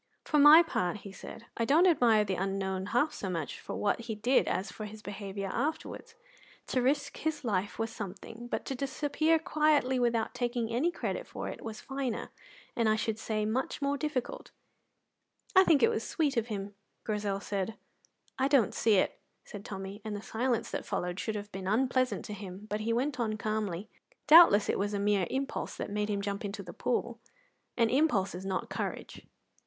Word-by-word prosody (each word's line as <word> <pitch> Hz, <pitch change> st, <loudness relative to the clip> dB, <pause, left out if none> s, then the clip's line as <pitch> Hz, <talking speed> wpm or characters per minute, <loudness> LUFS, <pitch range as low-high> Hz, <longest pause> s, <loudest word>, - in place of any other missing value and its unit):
"For 300 Hz, -, +2 dB
my 300 Hz, +4 st, +10 dB
part," 185 Hz, -, -2 dB
he 200 Hz, -, -9 dB
said, 225 Hz, +3 st, -10 dB
"I 230 Hz, -, +1 dB
don't 300 Hz, +9 st, +5 dB
admire 235 Hz, -, +4 dB
the 195 Hz, -, -1 dB
unknown 190 Hz, 0 st, -2 dB
half 245 Hz, +9 st, +1 dB
so 195 Hz, -, -4 dB
much 165 Hz, -5 st, -4 dB
for -, -, -6 dB
what 205 Hz, -, 0 dB
he 230 Hz, -1 st, -5 dB
did 240 Hz, +5 st, +2 dB
as 190 Hz, +3 st, -1 dB
for 215 Hz, -, -7 dB
his 210 Hz, +1 st, -10 dB
behaviour 200 Hz, -1 st, -5 dB
afterwards. 315 Hz, -, -3 dB, 0.5 s
To 255 Hz, -, +1 dB
risk 285 Hz, +3 st, 0 dB
his 310 Hz, -2 st, -2 dB
life 205 Hz, -4 st, -1 dB
was 225 Hz, 0 st, -2 dB
something, 225 Hz, +2 st, -8 dB
but -, -, -3 dB
to -, -, -3 dB
disappear 290 Hz, +4 st, +1 dB
quietly 300 Hz, -5 st, +2 dB
without 235 Hz, -2 st, +1 dB
taking 240 Hz, -2 st, -2 dB
any 275 Hz, +9 st, +2 dB
credit -, -, -4 dB
for -, -, -5 dB
it -, -, -8 dB
was 225 Hz, 0 st, -6 dB
finer 265 Hz, -4 st, -3 dB, 0.4 s
and 230 Hz, -2 st, +2 dB
I 215 Hz, -, +4 dB
should 220 Hz, 0 st, -2 dB
say 215 Hz, -1 st, -1 dB
much 235 Hz, +5 st, -1 dB
more 280 Hz, 0 st, 0 dB
difficult." 285 Hz, -4 st, -3 dB, 1.1 s
"I 375 Hz, -, +9 dB
think 315 Hz, -6 st, +4 dB
it -, -, +6 dB
was 445 Hz, -, -2 dB
sweet 295 Hz, -4 st, 0 dB
of 230 Hz, -1 st, 0 dB
him," 205 Hz, -2 st, -5 dB, 0.3 s
Grizel 205 Hz, -2 st, -1 dB
said. 200 Hz, +2 st, -3 dB, 0.6 s
"I 265 Hz, -, +3 dB
don't 275 Hz, -7 st, +3 dB
see 220 Hz, -2 st, +3 dB
it," 185 Hz, -, +1 dB, 0.3 s
said 205 Hz, -1 st, -9 dB
Tommy, 195 Hz, 0 st, -7 dB
and 215 Hz, -1 st, -4 dB
the 205 Hz, -, -6 dB
silence 235 Hz, 0 st, -1 dB
that -, -, -3 dB
followed 180 Hz, +1 st, -3 dB
should 220 Hz, -, -2 dB
have 205 Hz, 0 st, -6 dB
been 190 Hz, 0 st, -6 dB
unpleasant 255 Hz, +4 st, +1 dB
to 210 Hz, -, -6 dB
him; 195 Hz, 0 st, -8 dB
but 210 Hz, -, 0 dB
he 220 Hz, +2 st, -1 dB
went 255 Hz, +3 st, 0 dB
on 215 Hz, -2 st, -1 dB
calmly: 210 Hz, -3 st, -2 dB, 0.4 s
"Doubtless 300 Hz, -10 st, +8 dB
it -, -, 0 dB
was 205 Hz, +1 st, -1 dB
a -, -, -1 dB
mere 200 Hz, -2 st, +2 dB
impulse 270 Hz, +1 st, -3 dB
that -, -, -4 dB
made 210 Hz, +1 st, -1 dB
him 200 Hz, -1 st, -1 dB
jump 200 Hz, +2 st, -3 dB
into 200 Hz, 0 st, -5 dB
the 175 Hz, -, -9 dB
pool, 240 Hz, -1 st, -2 dB, 0.6 s
and 230 Hz, -2 st, +3 dB
impulse 245 Hz, -9 st, +2 dB
is 185 Hz, +2 st, -6 dB
not 190 Hz, -1 st, -2 dB
courage." -, -, -5 dB
220 Hz, 195 wpm, -30 LUFS, 200-265 Hz, 1.1 s, my